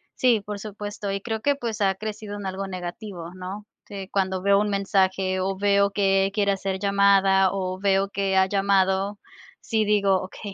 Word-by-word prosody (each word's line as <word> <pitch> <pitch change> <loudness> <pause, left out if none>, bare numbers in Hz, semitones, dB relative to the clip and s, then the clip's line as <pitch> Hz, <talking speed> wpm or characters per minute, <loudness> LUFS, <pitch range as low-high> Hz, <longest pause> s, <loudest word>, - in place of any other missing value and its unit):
sí, 240 -5 +3
por 205 0 -6
supuesto, 205 0 -6
y 195 0 -3
creo 220 -1 -4
que, 285 +2 +2
pues, 230 -5 -4
ha 195 -1 +3
crecido 210 0 -6
en 200 - -7
algo 190 +1 -4
negativo, 180 -1 -7
¿no? 190 +3 -7 0.2
Que 195 -2 -8
cuando 190 -1 -1
veo 200 +1 +4
un 210 0 0
mensaje, 190 -1 +1
o 190 +1 -1
veo 200 0 +3
que 195 -1 +2
quiere 200 -1 +2
hacer 190 0 -3
llamada, 195 -1 +4
o 185 -1 -3
veo 195 0 +2
que 195 -1 -1
ha 190 - +5
llamado, 195 0 +1 0.4
sí 220 -1 0
digo: 200 -2 +2
"Okey, 195 +1 -8
195 Hz, 180 wpm, -24 LUFS, 190-205 Hz, 0.4 s, ha